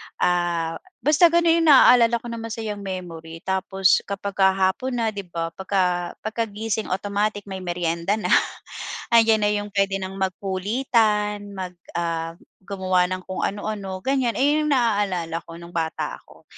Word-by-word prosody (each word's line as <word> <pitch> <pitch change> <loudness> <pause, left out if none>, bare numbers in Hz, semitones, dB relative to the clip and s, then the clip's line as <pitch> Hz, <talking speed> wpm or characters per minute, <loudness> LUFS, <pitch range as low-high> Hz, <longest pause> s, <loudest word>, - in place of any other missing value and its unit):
Ah, 175 -2 0 0.2
basta 305 +4 +6
ganun 335 0 +3
yung 325 - +2
naalala 245 -4 +7
ko 235 +1 -5
na 230 - -5
masayang 220 -2 -5
memory 170 -4 -7
tapos 190 0 +2
kapagka 195 -1 +1
hapon 195 +7 0
na, 225 -2 0
'di 200 -3 -7
ba? 165 -1 -4
Pagka 180 -2 -1
pagkagising 220 0 -2
automatic 205 +2 -1
may 190 -1 -7
merienda 175 +1 -1
na, 220 - -3 0.8
'andiyan 225 -2 +5
na 205 - +3
'yong 205 0 -2
puwede 195 -1 +1
nang 190 0 -6
magkulitan, 210 +2 0
mag, 185 -1 -6 0.2
ah, 165 -1 -2 0.3
gumawa 185 -2 +1
ng 185 0 -4
kung 185 - -4
anu 205 +1 -2
ano 195 -3 -4
ganyan. 260 -3 +1
Ayan 295 +3 +2
yung - - 0
naaalala 195 -8 0
ko 165 - -11
nung 170 0 -11
bata 160 -1 -2
ako. - - -19
195 Hz, 150 wpm, -23 LUFS, 180-220 Hz, 0.8 s, naalala